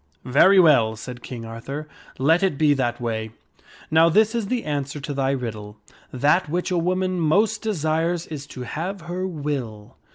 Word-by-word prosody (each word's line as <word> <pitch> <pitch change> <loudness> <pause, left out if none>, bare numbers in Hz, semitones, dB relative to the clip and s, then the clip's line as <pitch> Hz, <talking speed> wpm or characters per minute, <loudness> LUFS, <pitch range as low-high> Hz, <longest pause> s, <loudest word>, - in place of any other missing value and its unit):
"Very 185 +10 +5
well," 130 -10 +5
said 125 +3 -8
King 120 -2 -7
Arthur, 135 +7 -7 0.3
''let 160 +6 +3
it 190 -7 +1
be 150 -1 +4
that 120 -4 -1
way. 110 -2 -3 0.6
Now 160 +1 +5
this 215 +6 +3
is 230 -4 -2
the 245 0 -1
answer 145 -1 -3
to 145 +1 -5
thy 135 -1 0
riddle: 110 -6 -4 0.3
That 150 +6 +2
which 175 +3 -2
a 180 - +1
woman 185 +1 0
most 205 +7 +2
desires 165 -4 -1
is 145 -3 -7
to 125 - -8
have 175 +9 -4
her 180 +3 -4
will." 140 - -5
150 Hz, 170 wpm, -23 LUFS, 125-180 Hz, 0.6 s, Very